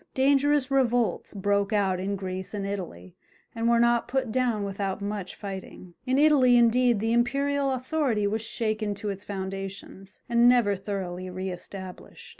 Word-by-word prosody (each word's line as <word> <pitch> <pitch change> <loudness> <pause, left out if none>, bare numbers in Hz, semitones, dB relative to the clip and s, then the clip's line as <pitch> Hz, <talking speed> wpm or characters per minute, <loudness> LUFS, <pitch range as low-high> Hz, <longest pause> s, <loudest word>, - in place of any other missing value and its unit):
Dangerous 275 0 +3
revolts 245 -8 +1
broke 200 +1 0
out 195 -3 +1
in 195 +2 -2
Greece 190 +1 -5
and 200 -1 -3
Italy, 175 - -6 0.4
and 230 +1 0
were 235 0 +4
not 235 0 +3
put 260 -3 -1
down 240 -4 0
without 195 0 -3
much 200 -2 -5
fighting. 190 -2 -8
In 260 +1 +2
Italy, 275 -5 +5
indeed, 240 -1 +4
the 225 +2 0
imperial 275 +3 +1
authority 255 -4 0
was 215 +2 -1
shaken 215 -2 -2
to 205 +1 -5
its 195 0 -4
foundations, 195 0 -7
and 235 0 +5
never 235 -5 +3
thoroughly 185 -2 -5
re 185 +1 -4
established. 185 +1 -9
210 Hz, 155 wpm, -26 LUFS, 195-245 Hz, 0.4 s, Italy